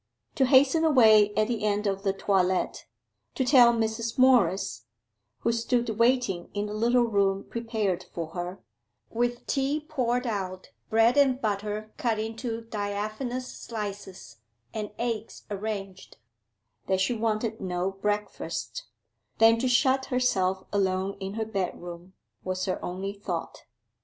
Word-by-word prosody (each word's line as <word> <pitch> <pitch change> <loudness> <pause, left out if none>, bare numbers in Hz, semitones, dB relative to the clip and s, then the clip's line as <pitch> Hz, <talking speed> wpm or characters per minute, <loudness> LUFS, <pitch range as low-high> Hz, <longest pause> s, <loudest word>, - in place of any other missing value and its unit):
To 265 - +2
hasten 275 +5 +5
away 220 -9 +6
at 215 0 +2
the 230 -3 -2
end 210 0 0
of 195 -1 -1
the 195 -1 +1
toilet, 190 -1 0 0.5
to 260 - 0
tell 245 -2 +7
Mrs. 225 0 -2
Morris 195 - +3 0.5
who - - +2
stood 235 +1 0
waiting 235 -7 +2
in 205 +1 -1
a - - -5
little 240 +3 +3
room 200 -3 +1
prepared 220 -6 -2
for 165 -2 -5
her, 175 0 -6 0.5
with 240 +1 -1
tea 275 +2 0
poured 255 -5 -1
out, 190 -5 -4 0.2
bread 225 +4 +4
and 265 -3 +4
butter 210 -1 -3
cut 230 -3 0
into 225 +1 -4
diaphanous 215 +4 -4
slices, 200 - -7 0.4
and 215 -2 -4
eggs 230 -2 -3
arranged 195 -2 -5 0.7
that 190 -1 +1
she 190 +6 +1
wanted 220 0 -1
no 180 0 -1
breakfast: 210 +2 -3 0.5
then 225 0 +6
to 255 - 0
shut 260 +2 +3
herself 190 -8 +1
alone 190 0 0
in 195 +1 -5
her 220 0 -1
bedroom, 180 -3 -5 0.3
was 185 0 -2
her 185 - -3
only 190 +3 -4
thought. 195 -4 -5
215 Hz, 135 wpm, -27 LUFS, 195-240 Hz, 0.7 s, tell